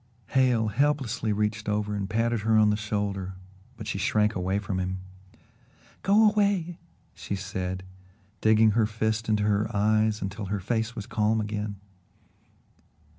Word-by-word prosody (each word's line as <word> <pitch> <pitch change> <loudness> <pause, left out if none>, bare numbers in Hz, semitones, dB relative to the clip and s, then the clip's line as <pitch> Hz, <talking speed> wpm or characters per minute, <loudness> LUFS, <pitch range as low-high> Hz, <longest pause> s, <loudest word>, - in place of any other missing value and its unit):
Hale 125 -4 +3
helplessly 130 -2 0
reached 105 +1 -1
over 105 0 -1
and 100 -1 -3
patted 115 +1 +1
her 110 +1 +2
on 105 -1 +5
the - - +2
shoulder, 100 -3 -3 0.4
but 110 - -7
she 100 - -3
shrank 105 +2 +2
away 95 +1 -1
from 100 -2 -2
him. 95 0 -2 1.0
"Go 210 +3 +5
away!" 200 -5 0 0.3
she 100 - -5
said, 95 -1 -4 0.6
digging 110 0 +5
her 110 0 +2
fist 110 +1 -1
into 105 -1 +2
her 105 +1 +1
eyes 110 +1 +2
until 100 +2 -4
her 100 +1 -2
face 110 +3 -2
was 105 -3 -5
calm 110 0 +1
again. 105 -1 -3
105 Hz, 145 wpm, -27 LUFS, 100-110 Hz, 1.0 s, on